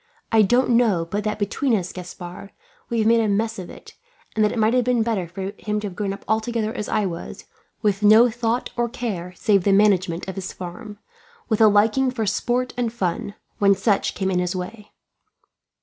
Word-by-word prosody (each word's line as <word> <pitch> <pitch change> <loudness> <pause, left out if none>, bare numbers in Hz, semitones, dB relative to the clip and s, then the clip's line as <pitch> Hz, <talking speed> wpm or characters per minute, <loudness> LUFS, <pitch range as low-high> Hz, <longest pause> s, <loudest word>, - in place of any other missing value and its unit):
I 225 -2 +5
don't 245 +5 +3
know 225 -8 +3
but 205 +5 -3
that 215 0 -1
between 225 +5 0
us, 185 -3 -3
Gaspard, 180 +1 -9 0.4
we 235 - -1
have 220 -1 +2
made 230 0 +5
a 225 - +1
mess 220 +2 0
of 180 - -7
it; - - -13 0.4
and 215 - +2
that 210 - +3
it - - -4
might 220 +1 +3
have 250 -1 +3
been 245 -1 +2
better 215 -6 -1
for 190 +3 -5
him 210 0 -2
to 210 - -5
have 190 -3 -6
grown 200 0 -2
up 195 - -8
altogether 220 0 -1
as 210 -5 -5
I 215 -1 +1
was, 170 -3 -6 0.4
with 205 -1 +1
no 215 +3 +7
thought 235 +1 -2
or 240 -1 0
care 190 -7 -4
save 200 0 +2
the 200 - +3
management 190 -4 +2
of 190 - -4
his 190 -1 -6
farm, 205 +4 -8 0.5
with 220 -1 +1
a 220 - +8
liking 215 +6 +3
for 240 -3 -2
sport 245 +5 -1
and 240 -2 0
fun, 200 -2 -3 0.2
when 200 -1 +5
such 200 +1 0
came 190 -1 -1
in 180 - +1
his 180 +1 -1
way." 205 +4 -7
210 Hz, 210 wpm, -22 LUFS, 190-230 Hz, 0.5 s, a